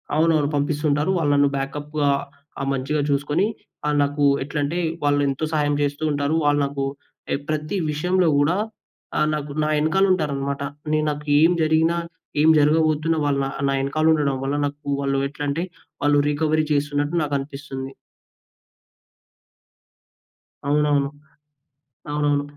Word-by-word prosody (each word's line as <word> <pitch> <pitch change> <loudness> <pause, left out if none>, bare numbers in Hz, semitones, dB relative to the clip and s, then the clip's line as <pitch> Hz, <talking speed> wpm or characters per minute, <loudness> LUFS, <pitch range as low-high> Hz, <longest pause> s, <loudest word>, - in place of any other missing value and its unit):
అవునవును. 155 -2 +3
పంపిస్తుంటారు. 150 +3 +1
వాళ్ళు 150 -4 +1
నన్ను 140 0 +4
బ్యాకప్‌గా 145 +1 -2 0.5
ఆహ్, 135 - -2
మంచిగా 135 +3 -1
చూసుకొని, 145 +5 +1 0.4
ఆహ్, 150 0 +1
నాకు 145 +1 -1 0.2
ఎట్లంటే, 145 +4 -2 0.2
వాళ్ళెంతో 145 0 +1
సహాయం 145 -1 +1
చేస్తూ 145 +1 -1
ఉంటారు. 145 +2 0
వాళ్ళు 145 0 +3
నాకు 140 0 -3 0.5
ఏ - - +3
ప్రతి 155 +5 -2
విషయంలో 180 +4 +1
గూడా, 145 +6 +2 0.6
ఆహ్, 150 - +3
నాకు, 150 -1 -5
నా - - 0
ఎనకాలుంటారనమాట. 155 -5 +1 0.3
నేను 155 0 +2
నాకు 150 +1 -7 0.2
ఏం 165 +2 +6
జరిగినా, 160 +2 +2 0.4
ఏం 155 - +5
జరగబోతున్నా 155 +1 +2
వాళ్ళు 140 -1 +1
నా - - -2
ఆహ్, - - -2
నా 135 - +1
ఎనకాలుండడం 150 -1 +2
వల్ల, 140 +1 -1
నాకు 145 +1 -10
వాళ్ళు 135 0 0
ఎట్లంటే, 145 +4 -2 0.4
వాళ్ళు 145 0 +4
రీకవరీ 155 +1 +1
చేస్తున్నట్టు 145 +2 0
నాకనిపిస్తుంది. 140 -1 -4 2.8
అవునవును. 145 -1 +2 1.0
అవునవును. 145 -1 +1
145 Hz, 120 wpm, -22 LUFS, 140-155 Hz, 2.8 s, ఏం